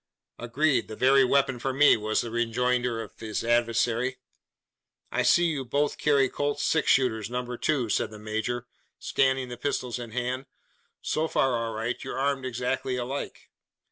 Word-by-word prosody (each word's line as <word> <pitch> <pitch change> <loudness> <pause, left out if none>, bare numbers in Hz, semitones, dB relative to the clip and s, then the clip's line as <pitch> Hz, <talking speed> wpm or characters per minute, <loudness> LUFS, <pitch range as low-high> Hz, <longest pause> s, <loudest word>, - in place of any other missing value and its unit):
"Agreed! 135 +5 +1
the 110 - -7
very 135 +3 +5
weapon 135 -1 +2
for 135 +3 -1
me!" 145 +3 +6
was 110 0 0
the 120 - -6
rejoinder 120 0 0
of 105 - -14
his 110 -2 -3
adversary. 120 +2 +1 0.9
"I - - +1
see 175 - +4
you 155 -5 -1
both 145 +3 -1
carry 140 -3 +3
Colt's 145 +2 -2
six 160 - +1
shooter 120 -5 +3
Number 125 0 -3
2," 130 -1 0
said - - 0
the 110 - -10
major, 110 +3 -3 0.3
scanning 130 -1 +1
the 120 - -7
pistols 125 -2 -2
held 120 -2 -7
in 115 - -10
hand. 125 +2 -2 0.6
"So 155 +1 0
far 135 -5 +1
all 115 -1 -3
right! 115 +3 -3
you're - - -5
armed 135 -1 0
exactly 125 +1 -2
alike." 130 +3 -5
125 Hz, 170 wpm, -27 LUFS, 115-135 Hz, 0.9 s, me